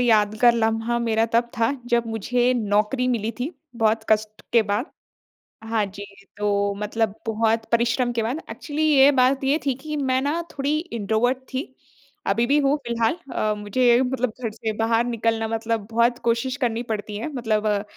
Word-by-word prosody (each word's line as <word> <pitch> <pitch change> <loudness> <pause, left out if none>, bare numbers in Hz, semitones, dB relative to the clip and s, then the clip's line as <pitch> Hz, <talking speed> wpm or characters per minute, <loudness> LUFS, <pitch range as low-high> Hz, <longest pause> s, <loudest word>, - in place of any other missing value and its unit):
यादगार 220 0 +4
लम्हा 225 +1 0
मेरा 225 -1 +1
तब 235 +1 +2
था, 225 0 +3 0.2
जब 235 -1 +1
मुझे 240 +3 +1
नौकरी 215 +3 +1
मिली 225 -3 0
थी 275 +7 -1 0.3
बहुत 220 -1 +1
कष्ट 215 0 +1
के 235 - +5
बाद। 210 +7 0 0.8
हाँ 225 -2 +1
जी, 200 +1 -9 0.3
तो 200 -1 0
मतलब 210 0 -1
बहुत 225 0 +1
परिश्रम 235 +1 +2
के 235 -1 -1
बाद, 250 +9 -2
एक्चुअली 305 0 -4
ये 280 -2 +7
बात 270 +2 +2
ये 280 +3 +2
थी 270 - +2
कि 305 -1 -3
मैं 260 -2 +1
ना 295 +4 0
थोड़ी 285 +2 -1
इंट्रोवर्ट 235 - 0 0.2
थी, 260 0 -4 0.5
अभी 230 +4 +2
भी 280 +4 +3
हूँ 285 0 +3
फिलहाल 235 +4 +1 0.2
अ, 215 0 0
मुझे 240 +4 +3
मतलब 255 -1 -1
घर 225 - -1
से 220 0 -4
बाहर 225 +1 +2
निकलना 225 -1 -1
मतलब 225 -1 -2
बहुत 235 +1 +2
कोशिश 235 +3 0
करनी 240 -4 -1
पड़ती 215 -3 -4
है, 220 - -3
मतलब 220 -5 -1
अ, 205 -1 +1
230 Hz, 175 wpm, -23 LUFS, 220-250 Hz, 0.8 s, ये